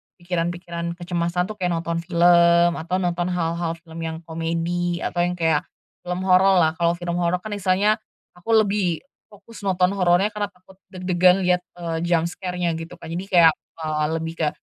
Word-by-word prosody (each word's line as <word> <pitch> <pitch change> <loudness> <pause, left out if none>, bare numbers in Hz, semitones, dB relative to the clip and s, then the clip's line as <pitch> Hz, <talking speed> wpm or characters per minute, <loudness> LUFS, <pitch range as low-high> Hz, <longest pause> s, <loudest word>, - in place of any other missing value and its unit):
pikiran-pikiran 175 -1 -3
kecemasan 175 0 -1
tuh 210 - -10
kayak 180 - 0
nonton 170 0 -2
film 170 0 +4
atau 170 +3 -3
nonton 175 -1 -1
hal-hal 170 -1 -1
film 165 -1 -10
yang 160 +1 -6
komedi 170 +2 -2
atau 175 - -2
yang 175 +1 +1
kayak, 160 -3 +1 0.4
film 180 +1 -2
hororlah 185 -3 +4
kalau 170 0 +2
film 175 0 -3
horor 175 0 +1
kan 215 - -6
istilahnya, 205 +2 +1 0.4
aku 225 +6 +1
lebih 200 -6 +1 0.2
fokus 215 +1 -14
nonton 180 -1 +2
horornya 190 +1 +2
karena 210 -1 -2
takut 190 -1 -22
deg-degan 185 0 +2
lihat, 180 0 +3 0.2
eee, 165 -2 -3
jumpscare-nya 175 +1 -1
gitu 165 +1 -8
kan - - -10
jadi 175 +3 -4
kayak, 170 -4 +6 0.3
eee, 155 -1 0
lebih 165 0 -3
ke 160 - +2
175 Hz, 165 wpm, -23 LUFS, 170-185 Hz, 0.4 s, kayak